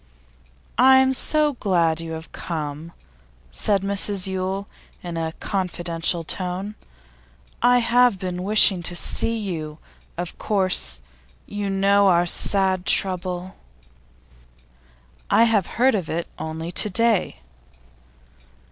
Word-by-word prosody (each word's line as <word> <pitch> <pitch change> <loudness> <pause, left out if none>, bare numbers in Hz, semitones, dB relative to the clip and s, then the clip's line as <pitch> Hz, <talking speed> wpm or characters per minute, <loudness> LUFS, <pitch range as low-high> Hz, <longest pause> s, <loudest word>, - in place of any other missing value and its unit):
'I'm 265 +1 +5
so 300 +2 +2
glad 170 -8 0
you 165 -1 -6
have 160 0 -9
come,' 155 -1 -6 0.6
said 200 - 0
Mrs 200 -1 -1
Yule, 190 +1 -3 0.4
in 175 -1 -6
a 160 -1 -3
confidential 175 -3 -2
tone. 185 +4 -4 0.9
'I 245 +1 +4
have 245 -2 +3
been 180 -1 -5
wishing 200 -2 +4
to 175 +1 -3
see 230 +6 0
you. 160 -8 -5 0.4
Of 175 0 -6
course, 185 - +1 0.4
you 205 -1 -4
know 200 +1 +3
of 190 - +5
our 175 +1 +2
sad 190 +1 +2
trouble?' 185 -1 0 1.7
'I 230 - +5
have 220 -5 +2
heard 260 +3 +4
of 190 -7 -3
it 170 +1 -3
only 160 +2 -5
to 210 - +1
day. 205 - +1
185 Hz, 115 wpm, -22 LUFS, 170-205 Hz, 1.7 s, I'm